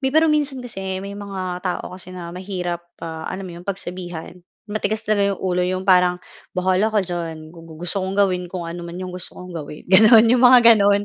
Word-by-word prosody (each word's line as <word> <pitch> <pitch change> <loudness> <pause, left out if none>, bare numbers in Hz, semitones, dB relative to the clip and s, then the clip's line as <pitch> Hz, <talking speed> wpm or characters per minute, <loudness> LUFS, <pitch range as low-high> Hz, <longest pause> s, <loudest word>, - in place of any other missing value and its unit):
may 265 - +1
pero 315 +4 +4
minsan 280 -4 -1
kasi 190 -4 -4
may 200 - -6
mga 190 -3 -5
tao 180 -1 -4
kasi 185 0 -9
na 170 -1 -7
mahirap, 180 -2 -4 0.2
ah, 160 -1 -6
alam 190 +1 -5
mo 180 - -8
'yon - - -15
pagsabihan. 180 -4 -5 0.3
Matigas 215 +1 -2
talaga 200 -2 +1
yung - - -16
ulo, 180 -1 +1
yung 185 +1 -1
parang, 180 -1 +4 0.4
"Bahala 185 +3 +2
ka 215 -3 +1
diyan, 165 -3 -5
gu 170 - -13
gu 160 - -11
gusto 195 +3 -1
kong 190 +1 -3
gawin 185 -3 +1
kung 180 -1 -5
ano 170 +1 -6
man 170 0 -7
yung 185 -1 -6
gusto 180 -1 -8
kong 180 0 -9
gawin." 150 -2 -8
Gano'n, 220 +4 +7
yung 240 +2 +4
mga 245 -2 +8
gano'n 205 -1 +3
185 Hz, 215 wpm, -21 LUFS, 180-205 Hz, 0.4 s, mga